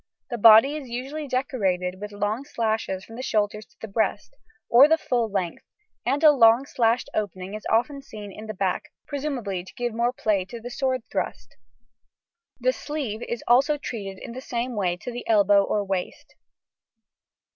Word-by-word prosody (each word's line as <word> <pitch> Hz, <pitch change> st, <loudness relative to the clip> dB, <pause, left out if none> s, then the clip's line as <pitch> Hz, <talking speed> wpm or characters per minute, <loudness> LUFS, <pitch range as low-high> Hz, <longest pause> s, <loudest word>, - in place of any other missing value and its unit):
The 240 Hz, -, -3 dB
body 225 Hz, +6 st, +8 dB
is 280 Hz, -5 st, -7 dB
usually 270 Hz, +5 st, -5 dB
decorated 195 Hz, -9 st, -1 dB
with 210 Hz, 0 st, -6 dB
long 205 Hz, +5 st, -2 dB
slashes 220 Hz, -8 st, -2 dB
from 225 Hz, -, -11 dB
the -, -, -4 dB
shoulders 210 Hz, -3 st, -1 dB
to -, -, -30 dB
the 225 Hz, -, -6 dB
breast, 220 Hz, -, -1 dB, 0.3 s
or 255 Hz, +5 st, +8 dB
the 320 Hz, +1 st, +4 dB
full 240 Hz, -7 st, 0 dB
length, 185 Hz, -4 st, -2 dB, 0.5 s
and 285 Hz, +3 st, +1 dB
a 305 Hz, -, +9 dB
long 235 Hz, -1 st, +5 dB
slashed 235 Hz, -3 st, +1 dB
opening 190 Hz, -2 st, -3 dB
is 215 Hz, -, -6 dB
often 275 Hz, +5 st, +1 dB
seen 210 Hz, -6 st, -9 dB
in 215 Hz, +3 st, -10 dB
the 215 Hz, -, -5 dB
back 195 Hz, +11 st, -2 dB
(presumably 255 Hz, -11 st, -3 dB
to 190 Hz, -, -14 dB
give 240 Hz, -1 st, -2 dB
more 235 Hz, +2 st, +1 dB
play 215 Hz, -6 st, 0 dB
to 235 Hz, +4 st, -8 dB
the 245 Hz, +2 st, -8 dB
sword 255 Hz, 0 st, -1 dB
thrust). 115 Hz, -, -4 dB, 1.0 s
The -, -, +2 dB
sleeve 275 Hz, -, -4 dB
is 235 Hz, -, -3 dB
also 275 Hz, +5 st, +4 dB
treated 200 Hz, -8 st, -6 dB
in 235 Hz, -, -8 dB
the 255 Hz, +2 st, -7 dB
same 245 Hz, -1 st, -3 dB
way 180 Hz, -4 st, 0 dB
to 245 Hz, -, -7 dB
the 240 Hz, 0 st, -6 dB
elbow 205 Hz, -2 st, +5 dB
or 205 Hz, +1 st, 0 dB
waist. 190 Hz, -2 st, -4 dB
225 Hz, 180 wpm, -25 LUFS, 205-255 Hz, 1.0 s, a